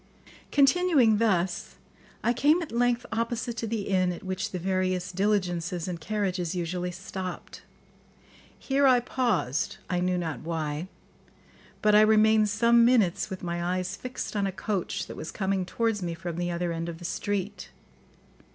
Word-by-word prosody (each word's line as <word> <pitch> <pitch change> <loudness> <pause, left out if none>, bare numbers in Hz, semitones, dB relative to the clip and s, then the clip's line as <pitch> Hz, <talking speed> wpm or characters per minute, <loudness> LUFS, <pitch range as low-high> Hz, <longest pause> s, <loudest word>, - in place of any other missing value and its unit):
] - - -21
Continuing 280 - +4
thus, 185 -6 0 0.5
I 235 - +3
came 295 +7 +4
at 320 - -9
length 245 +1 +1
opposite 230 +1 -2
to 225 - -2
the 220 -1 -2
inn 185 -2 +1
at 175 - -7
which 190 0 -3
the 185 - -4
various 185 0 -1
diligences 180 -3 0
and 175 -2 -5
carriages 185 -3 -2
usually 180 +1 -2
stopped. 185 0 -7 1.0
Here 275 +1 +2
I 255 -2 +6
paused, 225 - -1
I 180 - +1
knew 180 0 +1
not 165 -4 -3
why; 160 0 -3 1.0
but 210 0 +4
I 210 - +8
remained 215 0 +5
some 235 +3 +4
minutes 230 -8 +3
with 190 -1 -7
my 170 0 -2
eyes 185 +1 -1
fixed 255 -1 -6
on 200 -1 +1
a - - -2
coach 195 -1 -3
that - - -9
was 155 - -6
coming 190 -2 -1
towards 225 -2 0
me 170 -2 -3
from 170 -1 -5
the 175 0 -1
other 175 0 -2
end 165 +1 -3
of 165 - -6
the 175 - -10
street. 205 +2 -3
190 Hz, 165 wpm, -27 LUFS, 175-225 Hz, 1.0 s, I